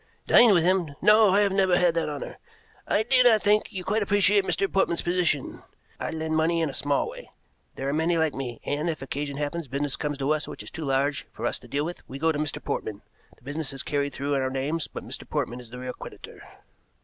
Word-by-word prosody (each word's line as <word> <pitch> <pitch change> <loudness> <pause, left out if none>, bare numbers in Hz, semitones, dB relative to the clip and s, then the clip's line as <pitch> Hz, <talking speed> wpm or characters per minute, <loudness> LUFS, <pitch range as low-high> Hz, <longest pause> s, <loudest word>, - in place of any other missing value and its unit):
"Dine 240 -2 +7
with 170 - +4
him? 175 -5 +1
No, 215 0 +6
I 200 +2 +4
have 200 -1 +2
never 190 -2 +3
had 175 -2 +3
that 165 -2 -1
honor. 145 -1 -6 0.5
I 215 - +2
do 255 +2 +5
not 225 -5 +5
think 210 +1 +3
you 185 -2 -5
quite 210 +4 0
appreciate 205 0 +3
Mr. 195 - +1
Portman's 190 -3 +1
position. 175 -6 0 0.4
I - - -3
lend 160 0 -2
money 165 +2 +2
in 160 -3 0
a - - -14
small 145 +1 0
way, - - -10 0.5
there 135 - -4
are 140 - 0
many 165 +2 +1
like 160 -3 +1
me, 125 -4 -5
and 150 +4 -1
if, 160 - -2
as - - -22
occasionally 140 +1 -3
happens, 160 +1 -4
business 140 +1 -2
comes 145 -1 -3
to 140 +2 0
us 155 0 0
which - - -7
is - - -9
too 160 -3 -6
large 135 +1 0
for - - -6
us - - -1
to - - -15
deal 145 +1 -1
with, 175 +1 -6
we 135 - -6
go 160 +3 +2
to 145 - -3
Mr. 150 -1 -2
Portman. 105 -1 -4 0.3
The - - -28
business 145 +1 -3
is 135 - -5
carried 145 -1 -1
through 140 +2 -2
in 135 - +1
our 130 - 0
names, 140 +5 -2
but - - -8
Mr. - - -8
Portman 120 +1 -2
is 120 -2 -12
the 125 - -9
real 125 0 -5
creditor." - - -11
155 Hz, 245 wpm, -26 LUFS, 140-185 Hz, 0.5 s, Dine